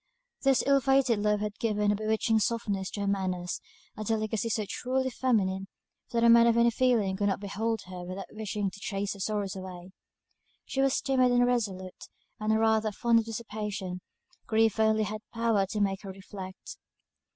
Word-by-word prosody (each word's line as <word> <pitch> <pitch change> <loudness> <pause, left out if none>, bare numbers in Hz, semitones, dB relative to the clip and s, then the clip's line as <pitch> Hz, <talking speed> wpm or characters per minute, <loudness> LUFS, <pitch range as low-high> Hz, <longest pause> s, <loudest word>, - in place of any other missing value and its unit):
This 270 -2 +3
ill 275 0 +4
fated 265 -3 +3
love 210 0 +1
had 210 0 -4
given 210 -2 +1
a - - +1
bewitching 220 +1 +1
softness 205 -3 -1
to 205 - -5
her 200 - -1
manners, 185 -3 -2 0.3
a 215 - -5
delicacy 220 +1 -1
so 215 -1 0
truly 260 +3 -1
feminine, 195 -7 0 0.4
that 235 -1 +1
a - - +6
man 235 0 +7
of 235 0 +3
any 235 0 +5
feeling 225 -6 +2
could 205 +1 0
not 195 - 0
behold 220 +3 -2
her 180 -1 -8
without 185 +2 -6
wishing 210 -2 -3
to 200 - -12
chase 200 0 -2
her 200 - -12
sorrows 200 -1 -2
away. 185 -1 -8 0.7
She 270 - -1
was 270 -1 +3
timid 255 -2 +3
and 245 0 +4
irresolute, 200 -7 -2 0.3
and 215 +1 +1
rather 220 -1 +2
fond 230 +2 +3
of 225 - -2
dissipation; 210 -5 -5 0.5
grief 220 -1 +2
only 220 0 +3
had 215 +1 -4
power 225 -4 +2
to 210 +2 -3
make 195 -1 0
her 195 - -8
reflect. 190 -1 -9
215 Hz, 180 wpm, -29 LUFS, 195-230 Hz, 0.7 s, man